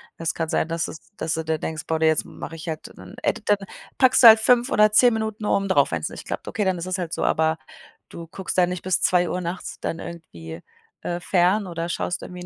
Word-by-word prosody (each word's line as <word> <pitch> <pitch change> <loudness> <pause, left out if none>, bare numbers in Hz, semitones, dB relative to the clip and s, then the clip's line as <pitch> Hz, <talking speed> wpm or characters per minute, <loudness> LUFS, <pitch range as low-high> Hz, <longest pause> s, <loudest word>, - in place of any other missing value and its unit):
Es 165 -1 -2
kann 165 -1 -3
sein, 160 - 0
dass 165 0 -1
es 155 - -9 0.2
dass 160 0 -2
du 160 - -2
dir 160 0 -2
denkst: 155 0 -4
„Boah, 160 0 -2
jetzt 160 -1 +3
mache 165 - -9
ich 165 +1 -7
halt 155 -1 -6
dann“, - - -12
ey, - - +2
dann 205 - 0 0.4
packst 260 0 +4
du - - +12
halt 220 0 +10
5 245 +3 +3
oder 210 0 +4
10 245 +2 +6
Minuten 220 -1 -3
oben 195 -1 +1
drauf, 145 -7 +3
wenn's 80 -1 -2
nicht - - -10
klappt. - - -5
Okay, 215 - -2
dann 190 -2 0
ist 170 - -5
es 185 0 -2
halt 175 -3 -4
so, - - -2
aber 160 0 +1 0.5
du 170 -1 -10
guckst 190 +3 -6
da 180 - +5
nicht 180 -1 -5
bis 185 -1 0
2:00 180 0 +2
nachts 175 +1 -6
dann 165 - -3
irgendwie, 85 - -9 0.4
äh, 175 0 -3
fern 185 +3 +2
oder 170 0 -4
schaust 175 - -3
irgendwie 180 0 -8
175 Hz, 240 wpm, -23 LUFS, 160-195 Hz, 0.5 s, du